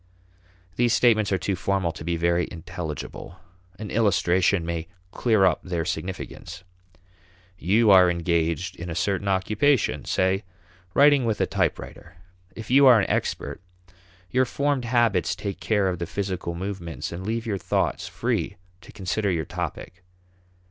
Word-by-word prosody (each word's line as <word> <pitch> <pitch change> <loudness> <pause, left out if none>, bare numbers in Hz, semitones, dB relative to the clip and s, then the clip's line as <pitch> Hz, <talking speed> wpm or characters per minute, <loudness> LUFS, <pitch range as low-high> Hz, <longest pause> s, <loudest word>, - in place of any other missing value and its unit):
These 120 -1 +3
statements 110 -4 +3
are 95 - +2
too 95 +1 -2
formal 95 -1 -1
to 80 - -10
be 85 +1 -1
very 85 +1 +1
intelligible. 85 0 -7 0.4
An 105 0 -7
illustration 95 -4 +2
may 85 -1 -3 0.2
clear 110 -4 +2
up 90 - +2
their 85 -3 -3
significance. 90 +1 -6 1.0
You 105 +6 +3
are 90 -2 +7
engaged 85 +1 -1
in 85 +1 -6
a 80 - -4
certain 100 +3 -1
occupation, 105 +8 +1
say 95 +2 +1 0.5
writing 145 -1 +6
with 110 -3 -1
a - - +3
typewriter. - - -3 0.4
If 115 +1 -8
you 135 +1 +7
are 120 -3 +8
an - - 0
expert, - - -2 0.7
your 130 +1 +3
formed 140 0 -1
habits 115 -6 +2
take 100 -2 -5
care 105 -3 +1
of 90 -2 -2
the 85 - -3
physical 95 -3 -3
movements 90 -3 -5
and 85 +2 -6
leave 115 +3 -2
your 100 -4 -2
thoughts - - -1
free - - -2 0.2
to - - -14
consider 100 +2 -2
your 80 -4 -1
topic. 90 +7 -6
95 Hz, 150 wpm, -25 LUFS, 85-110 Hz, 1.0 s, are